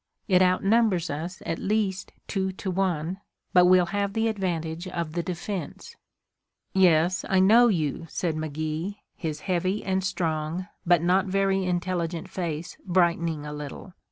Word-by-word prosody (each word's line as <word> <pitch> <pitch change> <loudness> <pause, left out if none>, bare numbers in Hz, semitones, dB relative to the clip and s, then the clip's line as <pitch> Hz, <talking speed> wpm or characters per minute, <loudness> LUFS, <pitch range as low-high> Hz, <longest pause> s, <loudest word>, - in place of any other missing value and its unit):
It 185 -2 +4
outnumbers 185 -1 +3
us 165 +5 -5
at 165 - -2
least 200 -2 -1 0.2
two 190 -2 -1
to 190 0 -4
one, 185 -1 -1 0.3
but 180 -1 +7
we'll 180 -1 +6
have 200 -1 0
the 225 +1 +1
advantage 175 -4 -3
of 170 -4 -4
the 170 - 0
defense." 175 -1 -5 0.8
"Yes, 180 -1 +4
I 190 - +4
know 225 +6 +7
you," 165 - -1
said 170 0 -1
McGee, 155 +4 -3 0.2
his 155 -3 -4
heavy 185 +2 -1
and 190 0 0
strong, 165 -1 -2 0.2
but 175 -2 +4
not 185 +2 +3
very 195 0 +1
intelligent 175 -2 -2
face, 170 -1 -4
brightening 170 -4 +1
a 150 - -5
little. 150 +5 -8
180 Hz, 145 wpm, -26 LUFS, 165-190 Hz, 0.8 s, but